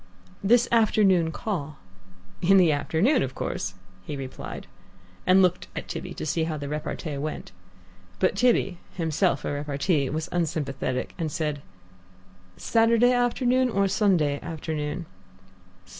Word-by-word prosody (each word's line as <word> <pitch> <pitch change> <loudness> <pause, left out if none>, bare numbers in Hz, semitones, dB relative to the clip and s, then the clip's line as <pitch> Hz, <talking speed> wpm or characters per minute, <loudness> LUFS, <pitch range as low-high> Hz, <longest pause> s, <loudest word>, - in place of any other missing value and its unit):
"This 235 +4 +4
afternoon 200 -7 +4
call." 155 -7 -4 0.6
"In 195 +3 +5
the 175 -4 +5
afternoon, 160 - +2
of 130 0 -3
course!" 95 - -3 0.3
he 145 - -5
replied, 135 -1 -7 0.6
and 185 +1 +6
looked 180 0 +1
at - - -5
Tibby 180 - -6
to - - -5
see 160 +2 0
how 160 -1 -3
the 145 -1 -5
repartee 150 0 -4
went. 150 +2 -5 0.7
But - - +1
Tibby, 195 -5 +2 0.2
himself 165 -2 0
a - - -1
repartee, 145 0 0
was 155 +1 -3
unsympathetic, 145 -6 -2
and 160 -2 -2
said, 150 -2 -2 1.0
"Saturday 230 +1 +3
afternoon 250 +1 +2
or 200 -3 +2
Sunday 175 -8 +2
afternoon?" 160 +1 -4
165 Hz, 130 wpm, -26 LUFS, 150-200 Hz, 1.0 s, and